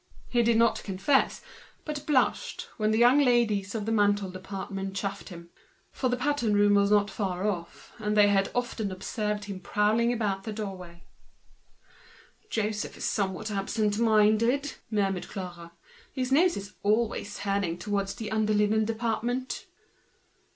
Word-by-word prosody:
He 240 - +3
did 230 -1 +3
not 230 0 +3
confess, 200 +8 +1 0.4
but 300 -1 -3
he - - -15
blushed, 280 -4 0
when 215 -2 +1
the 220 - +2
young 245 +4 +6
ladies 230 -6 +2
in 210 -2 -2
the 225 - -1
ready 205 -2 +4
made 185 -1 -6
department 195 +1 -6
chaffed 195 0 -4
him; 170 -2 -11 0.4
for 255 - -1
the 245 - 0
pattern 250 -6 +1
room 205 0 +4
was 200 0 +4
not 205 0 +3
far 190 -1 -2
off, 175 -5 -5
and 210 0 -1
they 205 -1 +7
had 195 -1 +2
often 245 -4 -2
observed 210 +2 -3
him 200 -2 -6
prowling 215 +5 +2
about 205 -5 -1
the 220 - -5
doorway. 185 -5 -7 1.5
"Joseph 215 - -2
is - - -4
somewhat 200 +1 -1
absent 205 +1 -1
minded," 230 +5 +3 0.2
murmured 195 -4 -1
Clara. 175 -3 -7 0.4
"His 260 -1 -3
nose 340 +6 +4
is 200 -1 -7
always 215 -1 0
turned 195 -4 -1
towards 200 -1 -2
the 215 +1 -6
under 215 -1 +1
linen 210 +1 +2
department." 235 +3 -2
210 Hz, 155 wpm, -28 LUFS, 195-230 Hz, 1.5 s, they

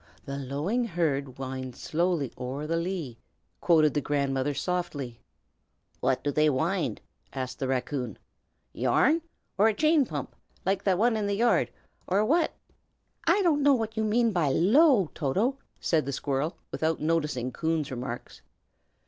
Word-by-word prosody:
"'The 140 - -4
lowing 145 - -1
herd 150 - -1
winds 130 -1 -5
slowly 165 -5 0
o'er 135 +4 -4
the 165 +2 -1
lea,'" 170 -8 -3 0.4
quoted 155 -4 +4
the 145 - 0
grandmother, 140 -1 0
softly. 145 -5 -3 0.8
"What 130 0 0
do 145 - 0
they 150 +2 +3
wind?" 165 +7 0 0.3
asked 130 -1 -4
the 135 - -1
raccoon. 130 -3 -2 0.6
"Yarn, 255 - +3 0.4
or 210 - +6
a 220 - +2
chain 310 -2 +3
pump 145 -4 -5 0.3
like 195 +1 +1
the 190 -3 +3
one 230 +3 +3
in 210 -2 -1
the 200 - 0
yard, 235 +3 +3 0.4
or 200 +3 +2
what?" 320 +6 +2 0.8
"I 380 +5 +4
don't 310 -5 +3
know 285 -1 +5
what 225 -2 -3
you 220 - 0
mean 230 +2 +2
by 170 -7 +1
low, 210 - +4
Toto!" 205 - 0 0.2
said 155 -4 +1
the - - -1
squirrel, 140 +3 -2
without 160 0 0
noticing 150 -6 0
Coon's 160 +1 -1
remarks. 120 -1 -6
160 Hz, 150 wpm, -28 LUFS, 135-210 Hz, 0.8 s, or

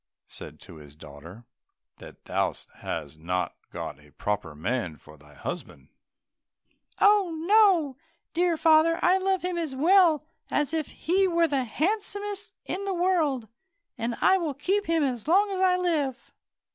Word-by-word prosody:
said - - -10
he - - -23
to - - -14
his 75 -1 -14
daughter, 80 +9 -12 0.5
"that - - -14
thou - - 0 0.3
hast 75 -2 -6
not 90 +3 -2 0.2
got - - -6
a 75 0 -19
proper 85 -2 -4
man 90 -1 -3
for 75 +3 -16
thy 75 -1 -19
husband?" 175 - -7 1.1
"Oh, 405 -5 +4
no, 375 - +4 0.4
dear 345 0 +1
father, 320 +1 +4
I 370 +2 +4
love 380 -1 0
him 360 -1 -2
as 310 -5 -4
well 325 0 +4 0.2
as 295 +1 0
if 315 -2 -1
he 380 +4 +1
were 340 -2 +2
the 275 -4 0
handsomest 405 - -3
in 390 - -4
the 390 -1 -1
world, 325 -10 +1 0.5
and 235 -1 -3
I 380 0 +5
will 310 -5 -3
keep 395 +8 -1
him 330 -2 +2
as 250 -4 -2
long 400 +5 +3
as 380 - -3
I 365 -1 +4
live." 305 -8 -2
320 Hz, 160 wpm, -26 LUFS, -, 1.1 s, I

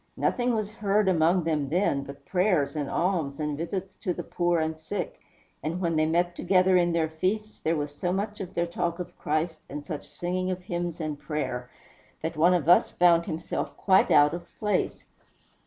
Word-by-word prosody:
Nothing 245 -1 +1
was 215 -1 -2
heard 210 -2 +1
among 175 0 +3
them, 155 -4 0
then, 165 -4 +1
but 140 0 -11
prayers, 180 -6 +1
and 145 -2 -2
alms, 165 -6 0
and 150 -1 -1
visits 185 +5 -4
to 180 - -1
the - - -4
poor 175 -1 +1
and 160 0 -1
sick; 175 +4 -5 0.4
and 165 +4 -2
when 170 -3 0
they 155 0 +3
met 175 +2 +1
together 185 0 +3
in 175 -1 +4
their 165 -1 +1
feasts, 195 +7 -2
there 165 +1 0
was 145 -1 -3
so 175 +4 -2
much 205 +2 -2
of 190 -1 -7
their 170 - +1
talk 170 0 -2
of 180 -1 -7
Christ, 155 +2 -1
and 145 +1 -6
such 155 -4 -6
singing 185 +1 -2
of 185 -1 -3
hymns 175 -1 -3
and 155 -2 -3
prayer, 130 -6 -3 0.5
that 165 +1 -2
one 175 +4 +5
of 165 -4 -1
us 175 - +6
found 170 -1 +4
himself 160 +2 -4
quite 190 -1 +4
out 145 0 +6
of 175 0 -6
place." 210 -1 -1
170 Hz, 195 wpm, -27 LUFS, 155-185 Hz, 0.5 s, us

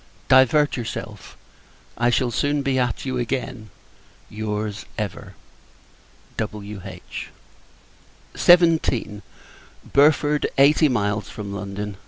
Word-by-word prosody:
Divert 130 +3 +4
yourself 120 -3 -7 0.6
I 120 +1 +1
shall 120 0 +1
soon 145 +4 0
be 135 -1 0
at 125 0 -1
you 130 -2 -2
again. 125 -2 -4 0.6
Your's, 105 0 -4
ever, 105 -6 -5 1.0
W.H. 100 -2 -7 1.1
XVII. 160 - +3 0.7
Burford, 150 +1 +3
Eighty 150 +3 +5
Miles 105 -4 -1
from 100 -2 -7
London. 100 0 -5
120 Hz, 90 wpm, -22 LUFS, 105-140 Hz, 1.1 s, Eighty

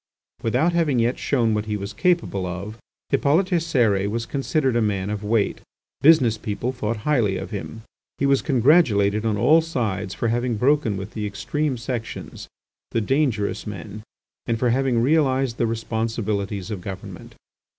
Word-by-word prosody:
Without 130 +10 +1
having 160 -6 +2
yet 120 +2 +1
shown 120 -5 +1
what 105 0 -2
he 105 -1 -1
was 100 +2 -6
capable 170 - 0
of, 100 +5 -6 0.3
Hippolyte 155 +7 +3 0.2
Cérès 110 -11 +1
was 115 +2 -2
considered 135 -1 0
a 120 - +3
man 100 -2 -1
of 105 0 -4
weight. 105 0 0 0.4
Business 130 -7 +5
people 105 +4 -3
thought 115 -3 -3
highly 120 -10 +2
of - - -6
him. 110 +2 -6 0.3
He 140 - 0
was 140 -1 +3
congratulated 115 - +3
on 105 -2 0
all 150 +10 +5
sides 105 - -3
for 115 - -1
having 120 0 0
broken 125 -4 +2
with 100 +2 -6
the 105 -2 -3
extreme 140 +7 -2
sections, 120 -1 -6 0.4
the - - 0
dangerous 115 -4 0
men, 105 +1 -7 0.5
and 115 -1 0
for 120 +1 +1
having 125 -2 +1
realised 135 -4 +2
the 115 - +1
responsibilities 110 -3 -2
of 100 -4 -4
government. 95 +1 -8
115 Hz, 160 wpm, -23 LUFS, 105-135 Hz, 0.5 s, Business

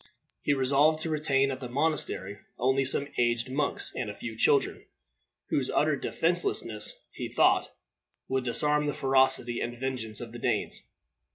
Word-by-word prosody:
He 145 - +2
resolved 140 +4 +3
to 160 - -2
retain 140 -3 +2
at 130 - -5
the 125 - -6
monastery 130 -8 -1 0.2
only 130 +2 +2
some 140 +2 0
aged 120 +1 +1
monks 145 +2 -1
and 120 -4 -3
a 105 - -6
few 115 +1 -6
children, 140 +5 +2 0.7
whose 130 -2 +1
utter 155 0 +2
defenselessness, 160 -9 -1
he - - -5
thought, - - +3 0.6
would 130 -1 0
disarm 150 +5 +2
the 145 - 0
ferocity 130 -3 +2
and 120 0 -4
vengeance 125 -5 -2
of 120 -2 -7
the 120 - -8
Danes. 115 -3 -1
130 Hz, 155 wpm, -28 LUFS, 120-145 Hz, 0.7 s, resolved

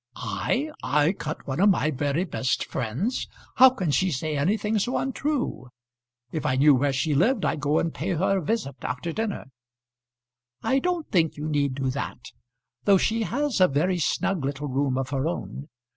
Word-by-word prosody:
"I! 115 - -2
I 150 +4 +2
cut 155 -5 -6
one 135 +3 -3
of 200 +2 +6
my 155 -5 +2
very 145 +4 0
best 135 -7 -1
friends! 150 - -2 0.3
How 260 0 +9
can 190 - -2
she 185 +6 +2
say 155 +1 -2
anything 210 +8 +1
so 245 +5 0
untrue? 270 - -2 0.6
If 155 - -3
I 130 - +1
knew 145 +2 +6
where 140 +2 +2
she 140 +3 0
lived 205 - +2
I'd - - 0
go 145 +1 +1
and 165 - 0
pay 185 +4 -2
her 190 +4 +1
a - - -6
visit 170 - -2
after 125 +9 -3
dinner." 220 +1 -3 1.2
"I 270 - +2
don't 355 0 -1
think 165 -7 +2
you 150 +1 -4
need 140 -3 0
do 135 -1 -1
that, 140 - -6 0.5
though 200 -1 +6
she 225 +4 0
has 260 +1 -1
a 185 - +8
very 175 +6 0
snug 170 +1 0
little 140 +2 -3
room 135 -1 0
of 135 0 -3
her 135 +2 0
own. 165 -3 -5
155 Hz, 185 wpm, -25 LUFS, 140-205 Hz, 1.2 s, How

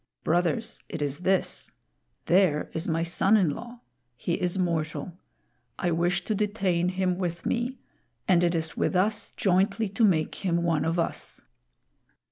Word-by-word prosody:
Brothers, 180 +8 0
it - - -5
is 145 0 -2
this: 190 +1 0 0.5
There 175 -4 +3
is 160 +2 -2
my 165 -1 +1
son 190 +5 +3
in 180 -7 +3
law; 240 +8 -8 0.3
he 170 - -2
is 180 +2 0
mortal. 160 -2 -1 0.6
I 175 - 0
wish 175 +2 +1
to 215 - 0
detain 195 -4 0
him 185 -1 0
with 170 -2 -3
me, 245 +2 -1 0.5
and 175 -2 +4
it 175 0 +2
is 160 -1 -1
with - - 0
us 210 +4 +1
jointly 195 +3 +1
to 200 +4 0
make 170 -5 +2
him 170 -2 +1
one 165 -3 +1
of 165 +2 0
us." 170 - -3
180 Hz, 155 wpm, -27 LUFS, 170-195 Hz, 0.6 s, and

